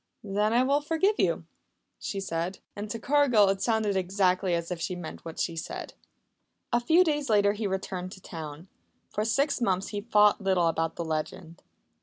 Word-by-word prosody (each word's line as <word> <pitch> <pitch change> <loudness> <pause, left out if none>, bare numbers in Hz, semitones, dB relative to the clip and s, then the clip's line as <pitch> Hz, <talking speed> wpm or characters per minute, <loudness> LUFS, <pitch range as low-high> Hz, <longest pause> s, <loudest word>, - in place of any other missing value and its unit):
"Then 210 +1 0
I 240 +2 +4
will 280 +3 +2
forgive 330 +8 +1
you," - - +1 0.5
she 195 - -4
said. 175 0 -3 0.2
And 205 +1 -5
to 230 - -3
Cargill 245 -5 +4
it 195 0 0
sounded 220 -3 +1
exactly 185 -1 +1
as 170 +1 -3
if 175 -2 -4
she 180 - -2
meant 175 -3 -8
what 165 -1 -8
she 170 - -1
said. 160 - -6 0.8
A 240 - +5
few 325 +9 +5
days 295 -5 -1
later 205 -1 +4
he 210 0 -2
returned 190 -1 -4
to - - -12
town. 160 0 -8 0.4
For 210 - -1
six 275 +5 +1
months 195 -3 +1
he 205 -1 -4
thought 210 -1 +4
little 190 -3 +2
about 165 0 0
the 170 - -4
legend. 160 +2 -4
200 Hz, 185 wpm, -28 LUFS, 180-230 Hz, 0.8 s, A